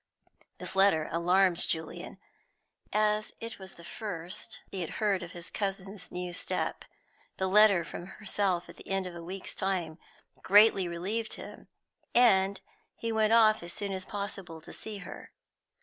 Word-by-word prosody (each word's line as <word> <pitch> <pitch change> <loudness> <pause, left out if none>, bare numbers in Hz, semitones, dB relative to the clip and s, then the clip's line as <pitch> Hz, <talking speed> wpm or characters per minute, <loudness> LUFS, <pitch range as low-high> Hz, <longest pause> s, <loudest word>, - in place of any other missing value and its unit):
This - - -6
letter 190 -5 +4
alarmed 180 +1 +3
Julian, 160 -1 -2 0.7
as 215 0 +1
it 230 -2 -6
was 190 -1 -11
the 170 - -13
first 180 -4 -5
he 190 - -3
had 170 - -4
heard 205 -4 +2
of 170 -1 -7
his 175 -1 -8
cousin's 195 -1 -4
new 180 0 -4
step; - - -2 0.5
the 190 - 0
letter 200 -2 +6
from 175 +2 -7
herself 195 -3 -1
at - - -12
the - - -12
end 195 -1 0
of 180 - -6
a 170 - -7
week's 185 +2 -5
time 180 -5 -1 0.4
greatly 200 -2 +6
relieved 200 +7 -2
him, - - -10 0.5
and 200 -5 +5 0.3
he 230 - -3
went 220 0 +3
off 220 -2 +6
as 170 0 -4
soon 200 +1 -3
as 190 -1 -4
possible 195 -5 -5
to 160 - -11
see 215 -2 -6
her. - - -10
195 Hz, 160 wpm, -30 LUFS, 175-210 Hz, 0.7 s, letter